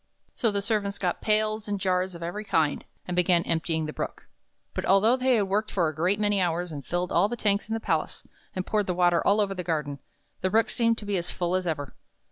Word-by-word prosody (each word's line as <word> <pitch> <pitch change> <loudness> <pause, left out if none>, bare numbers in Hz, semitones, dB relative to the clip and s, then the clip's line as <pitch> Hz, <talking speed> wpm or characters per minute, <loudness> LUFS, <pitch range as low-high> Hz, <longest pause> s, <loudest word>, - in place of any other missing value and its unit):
So 230 - +1
the 200 -1 -1
servants 200 -1 0
got 180 -2 -2
pails 215 0 +1
and 205 -1 -2
jars 185 -1 0
of 170 - -8
every 175 +5 -4
kind, 160 -7 0 0.2
and 180 - -2
began 175 -1 +3
emptying 160 -1 0
the 155 - -5
Brook. - - -5 0.5
But - - -3
although 205 +6 +4
they 255 -2 +2
worked 205 +3 0
for 175 -4 +1
a - - -6
great 180 +7 +1
many 205 -2 +2
hours, 175 0 -1
and 145 -2 -6
filled 175 +5 -2
all 185 +5 +3
the 240 - -4
tanks 205 0 +1
in 225 - 0
the - - -2
palace, - - -2 0.3
and 185 0 -2
poured 210 -2 0
the 180 - -1
water 175 -1 +3
all 205 +2 +4
over 200 -2 +1
the 180 -2 -4
garden, 150 -4 -2 0.4
the 185 - +1
Brook 225 +3 +2
seemed 230 -1 +2
to 210 - -7
be 200 -1 0
as 175 0 -3
full 175 0 -2
as 185 -1 0
ever. 145 -4 -3
185 Hz, 240 wpm, -27 LUFS, 175-210 Hz, 0.5 s, although